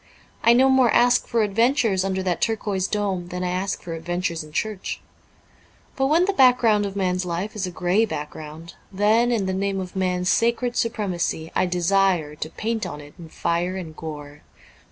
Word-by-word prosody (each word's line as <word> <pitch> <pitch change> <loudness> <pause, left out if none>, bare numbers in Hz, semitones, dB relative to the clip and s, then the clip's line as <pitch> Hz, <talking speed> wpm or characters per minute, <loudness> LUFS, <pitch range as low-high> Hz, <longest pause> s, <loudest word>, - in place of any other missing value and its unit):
I 230 - +6
no 260 +2 +5
more 265 -2 +4
ask 245 +2 +3
for 230 -2 +1
adventures 225 -1 +2
under 190 -1 -1
that 180 -2 -1
turquoise 205 -4 0
dome 195 -4 -2
than 180 +1 -4
I 180 - -1
ask 185 +2 -2
for 170 - -6
adventures 170 0 -3
in 155 - -13
church. 210 +4 -3 1.0
But 270 - +1
when 325 +5 +4
the 400 - 0
back 255 -7 +6
ground 210 -4 +2
of 195 - -8
man's 185 -2 0
life 180 +5 -4
is 200 -3 -2
a - - -4
grey 180 +5 +1
background, 155 -1 -7 0.2
then, 215 +5 +3
in 220 -5 0
the 190 - -1
name 195 +1 -1
of 185 0 -6
man's 180 -1 0
sacred 235 +1 +1
supremacy, 185 -8 -2
I 185 - +2
desire 180 -3 +1
to 150 +1 -6
paint 225 +5 -3
on 145 - -7
it 145 0 -13
in 165 -2 -10
fire 175 +3 -1
and 165 -4 -7
gore. 150 -2 -8
190 Hz, 190 wpm, -23 LUFS, 175-220 Hz, 1.0 s, I